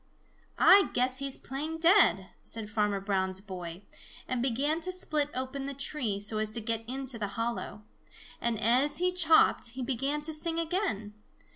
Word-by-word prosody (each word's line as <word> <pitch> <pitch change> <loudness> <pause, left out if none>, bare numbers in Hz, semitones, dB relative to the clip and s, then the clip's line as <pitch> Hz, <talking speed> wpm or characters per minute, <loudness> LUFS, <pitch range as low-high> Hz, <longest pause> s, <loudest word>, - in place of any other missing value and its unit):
"I 395 0 +6
guess 255 +1 +2
he's 275 -1 -1
playing 300 +5 -5
dead," 345 +5 +4
said 220 -2 -4
Farmer 210 -2 0
Brown's 190 -1 -1
boy, 180 -2 -8 0.4
and 255 -2 -1
began 275 +6 0
to 370 +3 -3
split 305 -5 0
open 260 +2 -4
the 280 - -5
tree, 255 -7 -1
so 210 +1 -1
as 215 0 -1
to 235 - +2
get 225 0 -3
into 260 -2 -3
the 205 - -2
hollow. 230 -2 -4 0.6
And 235 -2 0
as 250 +7 +3
he 360 +1 +1
chopped, 320 -8 +3
he 260 - -3
began 275 +4 -1
to 315 +1 -1
sing 325 +2 0
again. 325 - -2
255 Hz, 165 wpm, -29 LUFS, 215-305 Hz, 0.6 s, I